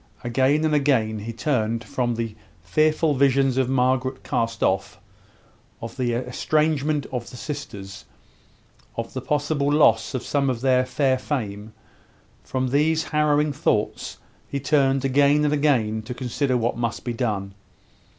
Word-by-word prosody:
Again 135 +6 +2
and 155 - +1
again 130 -7 +2
he 110 +3 -5
turned 115 -2 -1
from 120 -2 -1
the 115 -2 -4 0.3
fearful 155 - +2
visions 135 -1 +3
of 130 -1 +1
Margaret 130 0 +1
cast 115 -1 -1
off, 95 +3 0 0.8
of 115 -2 -7
the 125 -3 -1
estrangement 150 +4 0
of 125 -3 -4
the 125 - -10
sisters, 100 -10 -7 0.9
of 115 0 -4
the 130 - -4
possible 145 +1 0
loss 135 -4 +3
of 125 - -3
some 140 -2 +1
of 120 -3 -2
their 130 -1 +3
fair 130 -1 +1
fame 110 -6 -4 0.7
from 130 -1 -2
these 155 +4 +2
harrowing 150 -1 +1
thoughts 130 -7 -1 0.3
he 140 - -3
turned 135 -1 +2
again 145 +2 +3
and 150 - +2
again 125 -8 +1
to 120 +3 -7
consider 130 +1 -1
what 120 0 0
must 115 -1 -2
be 120 - -2
done. 105 -5 -2
130 Hz, 145 wpm, -23 LUFS, 115-145 Hz, 0.9 s, visions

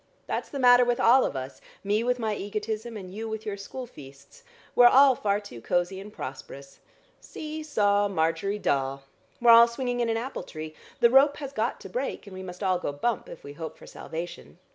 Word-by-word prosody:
That's - - -3
the 280 - -6
matter 250 -1 +6
with 240 0 0
all 255 +3 +5
of - - -3
us, 130 0 -6 0.2
me 205 +3 +1
with 250 +1 +1
my 220 -3 -1
egotism, 215 +3 -4
and 185 -2 -9
you 220 +2 -5
with 220 0 -5
your 210 -2 -3
school 205 +6 -7
feasts. 145 - -15 0.3
We're 245 - +7
all 270 +2 +7
far 205 -4 0
too 125 - -11
cosy 175 +6 -1
and 205 +2 -10
prosperous. 140 -3 -9 0.4
'See 310 0 -7
saw, 205 -9 +2
Margery 175 +2 -1
Daw!' 135 -7 -1 0.4
We're 240 -1 +6
all 230 0 +9
swinging 245 +1 -3
in 235 -1 0
an 225 - 0
apple 250 +4 -4
tree. 155 -1 -8 0.3
The 235 - +6
rope 275 +2 +5
has 280 -2 -7
got 225 0 -1
to - - -8
break, 260 +2 -4
and 200 - -11
we 185 - -7
must 180 +1 -8
all 185 -2 +1
go 160 - -3
bump, 195 +9 -2
if - - -11
we 140 - -9
hope 160 +1 -7
for - - -14
salvation. 170 +2 -8
210 Hz, 210 wpm, -27 LUFS, 175-245 Hz, 0.4 s, all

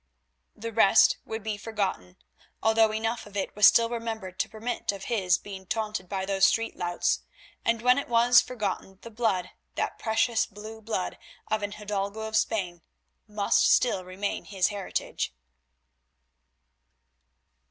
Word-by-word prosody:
The 230 +1 -6
rest 220 -1 +5
would 220 -1 -5
be 215 -1 -3
forgotten, 195 - -3 0.5
although 220 0 +4
enough 225 +1 -2
of 205 0 -8
it 195 - -3
was 210 -1 +8
still 230 0 +5
remembered 225 -5 -5
to - - 0
permit 225 +1 -3
of 195 -1 -8
his 190 -7 +2
being 190 -2 -10
taunted 215 -4 -3
by 190 -1 -2
those 195 0 +4
street 230 0 0
louts, 175 0 0 0.4
and 230 0 0
when 250 +2 +5
it 280 - -6
was 240 +1 +6
forgotten 200 -5 -4
the 230 - -9
blood, 215 -5 0 0.2
that - - -2
precious 225 +1 +1
blue 215 +2 -10
blood 210 -4 -3 0.3
of 215 0 +1
an 205 0 -3
hidalgo 205 0 -3
of 220 0 -4
Spain, 185 -6 0 0.5
must 210 -1 +2
still 215 -7 +3
remain 185 +3 -4
his 190 -3 +1
heritage. 195 - -3
210 Hz, 145 wpm, -27 LUFS, 195-225 Hz, 0.5 s, was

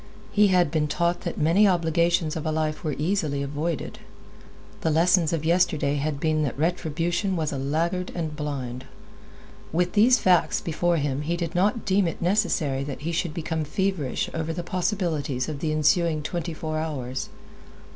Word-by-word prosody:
He 210 0 +5
had 180 -5 +3
been 155 -2 +1
taught 170 +3 0
that - - -4
many 170 +7 +4
obligations 170 -2 +2
of 160 - -3
a 155 - -1
life 155 -1 -1
were 150 -4 -1
easily 155 -4 0
avoided. 150 +4 -3 0.8
The 160 - 0
lessons 170 +1 +3
of 160 -2 -2
yesterday 160 -4 +2
had 145 0 -2
been 155 0 +1
that 140 -4 -2
retribution 175 +4 0
was 160 -3 -1
a 140 - -3
laggard 170 +6 -1
and 160 -3 -3
blind. 130 -4 -4 0.9
With 175 +2 0
these 240 +5 +6
facts 180 -6 +3
before 170 +1 0
him 145 -2 -1
he 170 +3 -1
did 170 -1 -3
not 205 +6 +1
deem 195 -2 +2
it 165 - -4
necessary 170 -7 +1
that 140 -1 -6
he 165 +3 -2
should 165 -1 -2
become 160 -1 -2
feverish 170 -3 -1
over 160 0 -2
the 175 - -4
possibilities 170 - -1
of 150 -3 -4
the 155 0 -1
ensuing 155 +1 +2
twenty 170 +1 -3
four 155 0 -3
hours. 135 -5 -4
160 Hz, 170 wpm, -25 LUFS, 150-175 Hz, 0.9 s, these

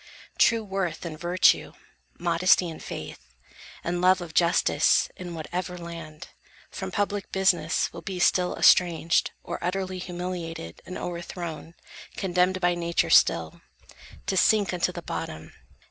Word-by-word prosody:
True 230 -1 +4
worth 190 -5 -3
and 165 -2 -5
virtue, 175 +2 +3 0.4
modesty 175 +1 +3
and 160 - -10
faith, 60 -1 -9 0.5
And 175 +1 -2
love 185 +1 +5
of 170 -3 -8
justice, 170 0 +3
in 175 -2 -7
whatever 180 +3 -4
land, 165 -3 -9 0.4
From 190 0 -5
public 205 +1 -2
business 190 -4 +1
will 170 - -8
be 185 +3 -5
still 180 0 +2
estranged, 170 -2 +4
Or - - -6
utterly 185 +1 -2
humiliated 175 - -6
and 185 - -6
O'erthrown; 170 -1 -6 0.4
condemned 180 0 +1
by 175 -1 +2
Nature 170 -1 0
still, 80 -1 +4 0.6
To 195 - -1
sink 205 0 +3
unto 175 - 0
the - - -8
bottom. 80 +1 -6
175 Hz, 130 wpm, -26 LUFS, 170-185 Hz, 0.6 s, love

